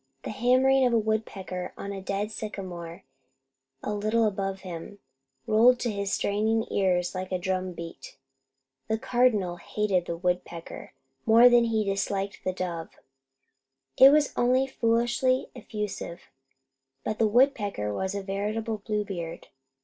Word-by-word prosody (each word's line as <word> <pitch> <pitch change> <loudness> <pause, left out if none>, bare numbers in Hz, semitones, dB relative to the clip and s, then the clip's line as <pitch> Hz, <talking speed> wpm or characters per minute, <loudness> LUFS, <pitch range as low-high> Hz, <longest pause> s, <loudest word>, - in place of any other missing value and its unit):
The - - -4
hammering 260 +2 +3
of 240 - 0
a - - +5
woodpecker 210 -4 -3
on 200 - -5
a 195 -1 -6
dead 200 +2 -2
sycamore, 180 -6 -7 0.8
a 210 - -2
little 215 +2 +1
above 195 -2 -2
him, 180 +2 -8 0.5
rolled 235 +3 +5
to 240 - 0
his 200 -1 -3
straining 220 +2 +1
ears 180 -2 +1
like 185 0 -5
a 185 - +1
drum 185 0 -2
beat. 170 -1 -9 0.7
The 220 - 0
Cardinal 220 -7 +1
hated 185 0 -1
the 170 - -3
woodpecker 175 -1 -4 0.3
more 230 +2 +8
than 240 -1 +5
he 220 -2 +1
disliked 195 0 -2
the 185 - 0
dove. 175 -3 -4 1.1
It 265 - +9
was 295 0 +3
only 255 +2 +3
foolishly 240 +1 +1
effusive, 210 -6 -6 0.7
but 215 - -3
the 225 - +4
woodpecker 210 - +2
was 190 - -2
a 200 - -3
veritable 210 +3 -2
Bluebeard. 200 -6 -4
205 Hz, 135 wpm, -27 LUFS, 185-230 Hz, 1.1 s, It